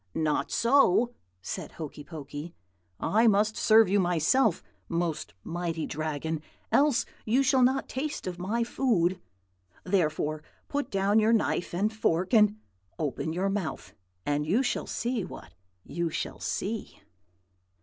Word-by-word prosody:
"'Not 155 -2 0
so,' 240 -2 +4 0.3
said - - -5
Hokey 150 -2 -7
Pokey. 150 +1 -8 0.4
'I 225 +3 +3
must 215 +1 +3
serve 220 -1 +6
you 200 +2 +3
myself, 180 - +2 0.3
most 170 - -2
mighty 165 -2 -3
Dragon, 155 +1 -3 0.3
else 280 -3 +3 0.2
you 245 +5 +2
shall 265 0 +3
not 260 +2 +3
taste 295 +3 -4
of 180 -1 -5
my 215 +6 0
food. 200 -8 +1 0.6
Therefore 155 -5 0 0.3
put 285 0 -2
down 195 +2 +3
your 220 +1 +4
knife 215 -5 +1
and 205 +5 0
fork, 185 -2 0
and 210 -1 +5 0.4
open 155 +1 -2
your 185 +4 0
mouth, 195 -5 -4 0.3
and 145 0 0
you 195 - +2
shall 220 - -1
see 235 -2 -2
what - - -10 0.3
you 170 -1 -2
shall - - -4
see.' 215 +2 -4
195 Hz, 135 wpm, -28 LUFS, 160-230 Hz, 0.6 s, serve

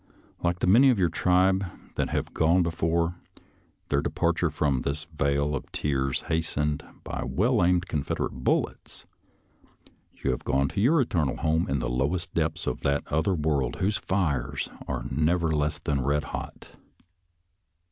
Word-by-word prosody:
Like 85 0 +1
the - - -1
many 120 +9 +6
of 125 - +3
your 90 -3 +3
tribe 95 +3 +3 0.3
that - - -1
have - - -2
gone 85 +3 +3
before, 85 +1 0 0.7
their 70 0 +2
departure - - 0
from 70 -4 0
this 75 +2 -3
vale 70 0 +1
of 65 - -6
tears 70 -3 -1
hastened 75 -2 -1 0.2
by - - -4
well - - +2
aimed 90 +1 +2
Confederate 75 -5 -2
bullets, - - -1 1.1
you 65 - -1
have 65 - -3
gone 70 +1 +1
to 100 - -2
your 145 +9 +4
eternal 80 - 0
home 80 +2 +1
in 70 - +1
the 65 - -2
lowest 70 +9 -1
depths 80 +1 -1
of - - -2
that 70 +3 +1
other 80 +5 +2
world 75 -6 0
whose 100 +2 0
fires 80 -10 -1 0.2
are - - -3
never 80 +1 +1
less 75 -1 0
than 70 -2 -1
red 75 +3 +1
hot. - - -7
80 Hz, 155 wpm, -27 LUFS, 70-90 Hz, 1.1 s, many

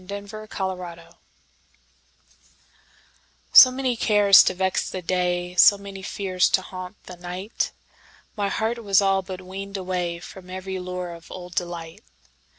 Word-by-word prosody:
Summer 205 +2 -7
Magic 180 -3 -5 2.4
SO 255 - +11
many 255 -1 -1
cares 205 -3 +6
to 185 - 0
vex 190 0 -1
the 185 -1 -6
day, 180 0 -1
So 190 +3 +7
many 200 -1 -9
fears 190 -1 0
to 190 - +2
haunt 185 +1 -8
the 180 - -11
night, 180 +5 -4 0.6
My 205 -1 -1
heart 230 +3 -2
was 195 -2 +4
all 195 -1 +2
but 185 -1 -8
weaned 195 +2 -8
awayFrom 180 0 -5
every 190 0 -5
lure 180 -1 -5
of 170 0 -13
old 180 -1 -9
delight. 170 -2 -5
185 Hz, 135 wpm, -24 LUFS, 180-200 Hz, 2.4 s, SO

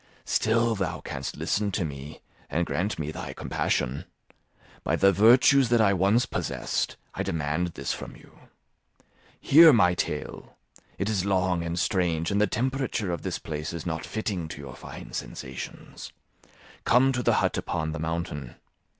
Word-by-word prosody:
Still 115 +1 +2
thou 90 -6 -2
canst 65 0 -6
listen 105 0 0
to 90 - 0
me 70 0 -8 0.3
and 85 +2 0
grant 100 +6 -2
me 75 -1 -3
thy - - -6
compassion. 65 +2 -2 0.8
By - - +1
the 100 0 +5
virtues 120 +6 +5
that 120 -1 +4
I 100 -3 +4
once 100 +6 +3
possessed, - - -2 0.2
I - - -3
demand 80 +2 -1
this 70 - -2
from - - -8
you. - - -18 1.0
Hear 160 +3 +8
my 90 -9 +4
tale; 90 - -5 0.4
it 100 - -2
is 105 -4 0
long 95 -3 +1
and 85 +1 -3
strange, 85 -3 0
and 100 +1 +2
the 105 - +4
temperature 125 -3 -1
of 85 - -3
this - - -3
place 75 +2 -5
is 85 - -6
not 80 -2 -3
fitting 100 -6 -3
to 80 - -8
your 70 - -9
fine - - -10
sensations; 65 0 -7 0.7
come 130 +3 +4
to 125 -1 -1
the - - +2
hut - - +1
upon 80 -2 -2
the 75 - -5
mountain. 80 -5 -4
90 Hz, 160 wpm, -27 LUFS, 80-110 Hz, 1.0 s, Hear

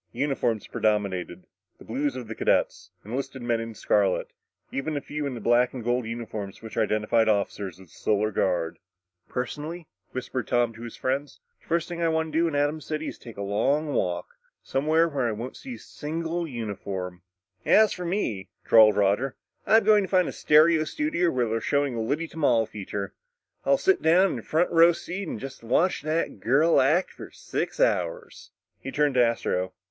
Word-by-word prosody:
Uniforms 120 -4 -1
predominated 100 -4 -1 0.3
the - - -15
blue 135 +6 -1
of 130 -4 -5
the 115 - -5
cadets, - - 0 0.2
enlisted 135 +3 -5
men 120 -1 +1
in 115 -1 -6
scarlet, 100 -3 +1 0.4
even 145 +2 -2
a - - 0
few 150 0 -4
in 130 - -4
the - - -6
black 120 +3 +2
and 125 - -5
gold 120 0 0
uniforms 110 -4 -6
which 110 - -8
identified 110 +1 +2
the - - +6
officers 100 -3 -2
of 95 - -14
the 80 - -23
Solar 105 0 0
Guard. 90 -4 0 0.5
"Personally," 150 +7 -4 0.3
whispered 130 -2 -4
Tom 120 -1 +2
to 115 - -12
his 120 -1 -7
friends, 135 +2 -2 0.2
"the - - -26
first 170 0 0
thing 170 -1 -5
I 165 - +2
want 160 -1 -1
to 160 - +2
do 170 - +3
at 160 - -3
Atom 145 +2 +1
City 155 +1 -4
is - - -10
take 115 -3 -11
a 100 - -3
long 140 +9 0
walk 90 -1 -1 0.4
somewhere 155 +4 +2
where 140 -6 -1
I 115 - -1
won't 115 +4 -6
see 260 -3 -8
a - - -11
single 165 +3 -4
uniform." 100 - -5 0.4
"As 215 -1 +5
for 180 - -6
me," 145 - -2 0.2
drawled 110 -2 +7
Roger, 105 +7 +2 0.3
"I'm 225 +1 +6
going 210 0 +5
to - - -11
find 185 -3 +3
a - - -3
stereo 155 +1 +4
studio 180 - 0
where 125 -5 0
they're 115 +1 -1
showing 140 0 +1
a 115 - -2
Liddy 150 +9 -1
Tamal 125 -9 +2
feature. 100 -1 -6 0.5
I'll - - +5
sit 385 -5 +2
down 180 +4 +4
in 125 - -3
a - - -8
front 160 +9 +1
row 170 +1 +6
seat 185 +3 -5
and 115 - -4
just 135 0 -8
watch 160 +11 +2
that 155 -7 -2
girl 140 +11 +4
act 155 +8 +2
for - - -10
about - - -17
six - - -4
hours." - - -1 0.3
He - - -6
turned 145 0 +1
to 125 -1 +5
Astro. 100 -5 0
130 Hz, 195 wpm, -26 LUFS, 110-160 Hz, 0.5 s, drawled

